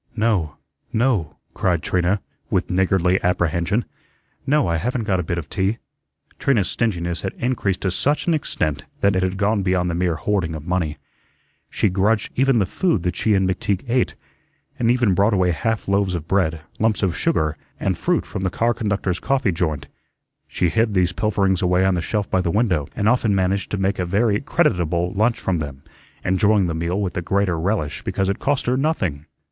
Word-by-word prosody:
"No, 105 Hz, -9 st, +1 dB, 0.4 s
no," 110 Hz, -, +1 dB, 0.2 s
cried 85 Hz, -3 st, 0 dB
Trina, 90 Hz, +2 st, +1 dB, 0.3 s
with -, -, 0 dB
niggardly 95 Hz, 0 st, +2 dB
apprehension; 90 Hz, +5 st, +1 dB, 0.6 s
"no, 150 Hz, +1 st, +3 dB
I 85 Hz, -1 st, +1 dB
haven't 120 Hz, +6 st, -1 dB
got 95 Hz, -4 st, 0 dB
a -, -, -1 dB
bit 85 Hz, +2 st, -3 dB
of 80 Hz, -4 st, -4 dB
tea." 95 Hz, +7 st, -1 dB, 0.6 s
Trina's 110 Hz, -9 st, +2 dB
stinginess 85 Hz, -7 st, -1 dB
had 95 Hz, -, -3 dB
increased 115 Hz, -7 st, -1 dB
to 95 Hz, -, 0 dB
such 145 Hz, +11 st, 0 dB
an 170 Hz, -, +2 dB
extent 75 Hz, -, -2 dB, 0.2 s
that 100 Hz, -1 st, +3 dB
it 95 Hz, -, +2 dB
had 95 Hz, 0 st, -1 dB
gone 105 Hz, +1 st, +1 dB
beyond 90 Hz, -2 st, +1 dB
the -, -, -3 dB
mere 85 Hz, -1 st, 0 dB
hoarding 90 Hz, -4 st, -1 dB
of 75 Hz, -1 st, -8 dB
money. 85 Hz, -4 st, -1 dB, 0.7 s
She -, -, +1 dB
grudged 100 Hz, +4 st, +1 dB
even 135 Hz, -1 st, +3 dB
the 100 Hz, -, +3 dB
food 110 Hz, -, 0 dB
that 90 Hz, 0 st, -1 dB
she 110 Hz, -2 st, +2 dB
and 95 Hz, -1 st, +2 dB
McTeague 95 Hz, +3 st, -1 dB
ate, 125 Hz, +1 st, +1 dB, 0.6 s
and 115 Hz, -, +2 dB
even 120 Hz, -5 st, +3 dB
brought 100 Hz, +4 st, +3 dB
away 90 Hz, -2 st, +2 dB
half 110 Hz, +5 st, -2 dB
loaves 100 Hz, -2 st, +1 dB
of 80 Hz, -2 st, -5 dB
bread, 85 Hz, -5 st, +1 dB, 0.2 s
lumps 110 Hz, -1 st, +1 dB
of 95 Hz, -3 st, +1 dB
sugar, 80 Hz, 0 st, 0 dB, 0.2 s
and -, -, 0 dB
fruit -, -, 0 dB
from -, -, -5 dB
the 95 Hz, -, 0 dB
car 115 Hz, +6 st, +1 dB
conductors' 100 Hz, -5 st, -1 dB
coffee 130 Hz, -6 st, +1 dB
joint. 80 Hz, -5 st, -2 dB, 0.6 s
She 90 Hz, -, 0 dB
hid 110 Hz, +3 st, +1 dB
these 90 Hz, -1 st, +3 dB
pilferings 95 Hz, -1 st, +1 dB
away 90 Hz, +1 st, +3 dB
on 95 Hz, -, +3 dB
the 90 Hz, -, 0 dB
shelf 105 Hz, +3 st, -2 dB
by 95 Hz, -, +1 dB
the 85 Hz, -, -1 dB
window, 90 Hz, -, +1 dB
and 105 Hz, -, 0 dB
often 115 Hz, -3 st, +3 dB
managed 95 Hz, +1 st, 0 dB
to 100 Hz, -, -2 dB
make 95 Hz, +1 st, 0 dB
a 90 Hz, -, 0 dB
very 105 Hz, +3 st, +2 dB
creditable 90 Hz, -, +1 dB
lunch 110 Hz, +4 st, +1 dB
from 90 Hz, -3 st, -1 dB
them, 70 Hz, -3 st, -6 dB, 0.4 s
enjoying 100 Hz, +2 st, +3 dB
the 85 Hz, -, -1 dB
meal 85 Hz, +4 st, -1 dB
with 95 Hz, -3 st, -2 dB
the 90 Hz, -, -2 dB
greater 95 Hz, -1 st, 0 dB
relish 80 Hz, -6 st, -1 dB
because 95 Hz, 0 st, -1 dB
it 100 Hz, -, -1 dB
cost 140 Hz, 0 st, 0 dB
her 125 Hz, -, +1 dB
nothing. 90 Hz, -, -1 dB
95 Hz, 195 wpm, -21 LUFS, 90-110 Hz, 0.7 s, no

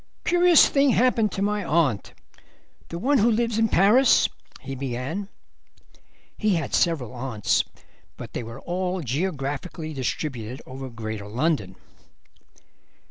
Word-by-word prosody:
"Curious 350 Hz, -2 st, +6 dB
thing 275 Hz, 0 st, +3 dB
happened 230 Hz, -3 st, +3 dB
to 195 Hz, -, -1 dB
my 205 Hz, 0 st, 0 dB
aunt, 155 Hz, -, 0 dB, 0.7 s
the 170 Hz, -, -6 dB
one 270 Hz, +9 st, +2 dB
who 225 Hz, +3 st, +4 dB
lives 230 Hz, 0 st, +1 dB
in 225 Hz, -, +4 dB
Paris," 220 Hz, +7 st, +5 dB, 0.3 s
he 135 Hz, 0 st, -6 dB
began. 135 Hz, +9 st, -4 dB, 1.1 s
He 215 Hz, -3 st, +2 dB
had 160 Hz, -5 st, -3 dB
several 150 Hz, -, +1 dB
aunts, 120 Hz, -4 st, 0 dB, 0.5 s
but -, -, -9 dB
they -, -, -3 dB
were 115 Hz, +3 st, -9 dB
all 180 Hz, +1 st, -2 dB
geographically 150 Hz, +2 st, -3 dB
distributed 130 Hz, -3 st, -4 dB
over 130 Hz, 0 st, -7 dB
Greater 110 Hz, -3 st, -6 dB
London. 115 Hz, -, -1 dB
160 Hz, 125 wpm, -24 LUFS, 130-210 Hz, 1.1 s, Curious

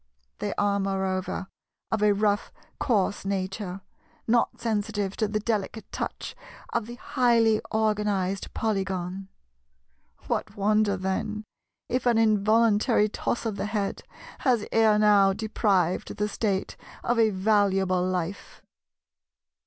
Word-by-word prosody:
They 205 Hz, -, -3 dB
are, 200 Hz, 0 st, +2 dB
moreover, 190 Hz, -1 st, -2 dB, 0.5 s
of 220 Hz, -, 0 dB
a 210 Hz, 0 st, +5 dB
rough 205 Hz, 0 st, +1 dB, 0.3 s
coarse 205 Hz, -6 st, +1 dB
nature, 195 Hz, 0 st, -3 dB, 0.4 s
not 235 Hz, +1 st, +1 dB
sensitive 205 Hz, -3 st, -1 dB
to 215 Hz, -, +1 dB
the 210 Hz, +1 st, -1 dB
delicate 215 Hz, 0 st, -3 dB
touch -, -, -5 dB, 0.4 s
of 235 Hz, -2 st, -1 dB
the 240 Hz, -, -7 dB
highly 230 Hz, -4 st, +2 dB
organized 210 Hz, -3 st, 0 dB
Polygon. 195 Hz, -3 st, -2 dB, 1.0 s
What -, -, -3 dB
wonder 205 Hz, 0 st, +2 dB
then 190 Hz, +3 st, -2 dB, 0.4 s
if 250 Hz, 0 st, -1 dB
an 235 Hz, -2 st, +4 dB
involuntary 215 Hz, 0 st, +3 dB
toss 235 Hz, -, -2 dB
of 215 Hz, -3 st, -2 dB
the -, -, -2 dB
head 210 Hz, -2 st, -2 dB, 0.4 s
has 240 Hz, -5 st, +2 dB
ere 220 Hz, -2 st, +4 dB
now 205 Hz, -2 st, +5 dB
deprived 200 Hz, -4 st, 0 dB
the 210 Hz, -, 0 dB
State 200 Hz, -2 st, -2 dB, 0.3 s
of 240 Hz, -1 st, +1 dB
a 225 Hz, -1 st, +5 dB
valuable 195 Hz, -2 st, +2 dB
life! 185 Hz, 0 st, -4 dB
210 Hz, 120 wpm, -26 LUFS, 195-220 Hz, 1.0 s, a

